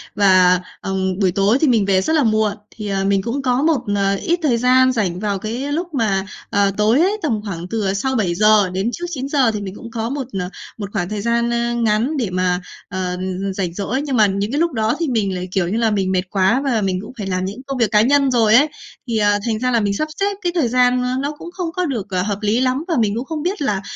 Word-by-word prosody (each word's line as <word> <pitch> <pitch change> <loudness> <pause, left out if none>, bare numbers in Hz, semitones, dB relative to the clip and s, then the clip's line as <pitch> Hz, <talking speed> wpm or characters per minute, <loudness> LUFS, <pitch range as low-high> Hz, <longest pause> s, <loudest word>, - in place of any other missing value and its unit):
và, 185 -3 +5 0.2
ừm, 190 -1 -2
buổi 190 -3 +3
tối 200 +5 +2
thì 315 - +4
mình 225 -6 +3
về 190 -1 +3
rất 315 - 0
là 300 - +3
muộn. 215 -2 +2 0.2
Thì, 210 -2 -6
ờ, 195 -1 -1
mình 195 0 +2
cũng 240 +7 -3
có 255 -1 +1
một, 305 -4 +2
ờ, 200 0 +1
ít 340 - -1
thời 255 -6 +2
gian 255 +2 +4
rảnh 195 -8 -1
vào 200 -1 -1
cái 240 +8 -4
lúc 340 +3 -3
mà, 200 -7 0 0.2
ờ, 200 -1 +2
tối 215 +5 +3
ấy, 395 +4 +2
tầm 230 - -1
khoảng 175 -4 -5
từ, 215 +1 -2
à, 190 - +1
sau 265 +7 -1
7:00 210 0 +3
đến 190 +5 -1
trước 350 - -4
9:00 270 -4 +1
thì 210 -1 -4
mình 195 -1 -6
cũng 230 - -10
có 225 0 -3
một, 275 -2 -4
ờ, 180 0 -3 0.3
một 205 -3 -5
khoảng 180 -3 -2
thời 210 -1 -3
gian, 235 +1 +1
a, 235 0 0
ngắn 235 +5 +1
để 235 -7 -1
mà, 180 0 0 0.3
ờ, 185 0 -3
ừm, 180 - -7 0.2
ừm, 195 -1 -2
rảnh 185 -3 -3
rỗi. 210 +8 -2
Nhưng 280 -3 -2
mà 215 - +6
những 200 +2 -2
cái 290 - 0
lúc 335 -2 +1
đó 220 -1 0
thì 335 - 0
mình 210 -7 0
lại, 180 0 -4
kiểu 185 -2 0
như 200 +6 -1
là, 230 -1 +2
mình 195 -2 0
mệt 185 -1 +2
quá 195 +7 +2
và 240 -6 +1
mình 185 -2 -1
cũng 215 - -9
phải 205 -3 -4
làm 185 -1 -1
những 205 +6 -6
công 275 -1 -3
việc 230 -4 +1
cá 210 -1 +5
nhân 275 +3 +3
rồi 225 -3 +4
ấy, 285 +5 +6 0.4
thì, 230 -2 -1
ờ, 205 -1 +3
thành 220 -2 -1
ra 255 0 0
là 235 - +3
mình 205 -2 0
sắp 310 +10 -1
xếp 400 0 0
cái 350 -3 0
thời 315 -8 +2
gian, 250 +1 +3
ơ, 250 - -1
nó 285 +2 -2
cũng 335 +3 -10
không 350 -2 -4
có 360 +2 -1
được, 245 - -3
ờ, 185 -1 0
hợp 200 +1 -2
lý 215 +3 +1
lắm 260 +3 0
và 335 - 0
mình 215 -2 +1
cũng 240 - -3
không 305 0 -4
biết 370 +2 -2
là 205 -8 0
220 Hz, 275 wpm, -19 LUFS, 195-260 Hz, 0.4 s, mà